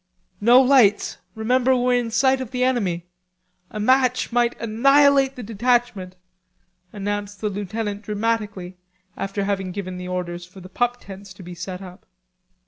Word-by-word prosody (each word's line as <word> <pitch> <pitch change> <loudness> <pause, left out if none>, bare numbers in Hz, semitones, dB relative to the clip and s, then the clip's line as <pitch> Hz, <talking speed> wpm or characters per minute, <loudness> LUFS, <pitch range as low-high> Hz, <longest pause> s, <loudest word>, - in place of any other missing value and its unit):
"No 240 +4 +7
lights, 255 -6 +4 0.2
remember 250 +4 +2
we're 250 0 +1
in 245 -2 0
sight 260 +4 +2
of 255 - -5
the 250 0 -1
enemy. 195 -10 0 0.6
A 215 - -7
match 255 +3 +2
might 240 0 +1
annihilate 275 +4 +4
the 250 - -7
detachment," 225 -4 0 0.8
announced 205 0 -4
the 210 - -1
lieutenant 205 +1 -4
dramatically 210 -4 -3 0.4
after 195 +1 -3
having 195 -2 -2
given 185 -1 -6
the 180 - -6
orders 175 -1 -4
for 180 +2 -14
the 185 0 -12
pup 245 +5 0
tents 195 0 -11
to 185 - -12
be 175 +1 -9
set 180 +2 -7
up. 185 +1 -13
210 Hz, 150 wpm, -22 LUFS, 190-245 Hz, 0.8 s, No